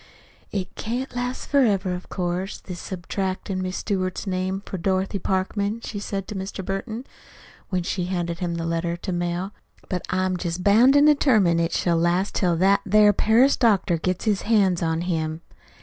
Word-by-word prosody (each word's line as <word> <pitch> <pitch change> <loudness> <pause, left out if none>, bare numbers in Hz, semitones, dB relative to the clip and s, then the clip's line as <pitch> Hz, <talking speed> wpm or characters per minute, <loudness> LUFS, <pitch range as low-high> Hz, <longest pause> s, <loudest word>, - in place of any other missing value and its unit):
"It 190 -2 -3
can't 245 +4 -4
last 245 +1 -3
forever, 205 -10 +2
of 180 +1 -7
course 180 +1 -3
this 180 -2 -8
subtractin' 190 +1 -3
Miss 185 0 -3
Stewart's 185 -2 -2
name 190 +1 -2
for 190 - -5
Dorothy 190 +2 0
Parkman," 200 +4 -1
she 205 - -5
said 195 -1 -4
to - - -5
Mr. 190 0 -5
Burton, 220 +6 -4 0.6
when 185 -2 -1
she 180 +1 -2
handed 175 -2 -2
him 175 -2 -2
the 165 0 -3
letter 165 +1 -1
to 180 - -5
mail. 175 +2 -2 0.4
"But 180 -3 -1
I'm 185 0 0
jest 175 0 -3
bound 240 +7 +6
an' 290 - +6
determined 220 - +4
it 165 - 0
shall 170 -2 +1
last 175 +4 +1
till 175 -3 +1
that 195 +4 +3
there 210 +1 +5
Paris 235 +7 +4
doctor 200 -7 +2
gets 185 +4 -2
his 210 -3 +1
hands 200 -5 +2
on 160 0 0
him. 160 -2 -2
185 Hz, 175 wpm, -24 LUFS, 175-205 Hz, 0.6 s, bound